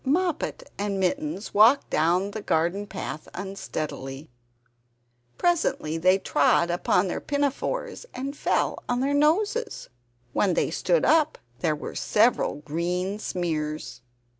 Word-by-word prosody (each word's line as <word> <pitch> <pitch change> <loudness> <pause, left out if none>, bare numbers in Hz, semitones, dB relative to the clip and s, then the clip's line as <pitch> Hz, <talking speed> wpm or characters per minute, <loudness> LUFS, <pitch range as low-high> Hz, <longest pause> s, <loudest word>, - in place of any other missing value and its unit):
Moppet 355 - -1
and 200 -1 -1
Mittens 280 +3 -2
walked 225 +7 +5
down 175 +6 +2
the 215 - -5
garden 175 +4 0
path 185 -5 -6
unsteadily. 155 -7 -5 1.1
Presently 315 - +1
they 185 +3 +5
trod 170 -1 +2
upon 180 +2 +2
their - - -3
pinafores 385 - -2
and 275 +3 -5
fell - - 0
on 245 0 +1
their 275 +2 +1
noses. 410 +11 +1 0.4
When 190 -4 +2
they - - +1
stood - - +1
up 310 -1 +3 0.2
there 155 +2 +1
were 150 - -7
several 225 +4 +2
green 180 +6 -2
smears! 155 - -3
200 Hz, 120 wpm, -26 LUFS, 170-285 Hz, 1.1 s, walked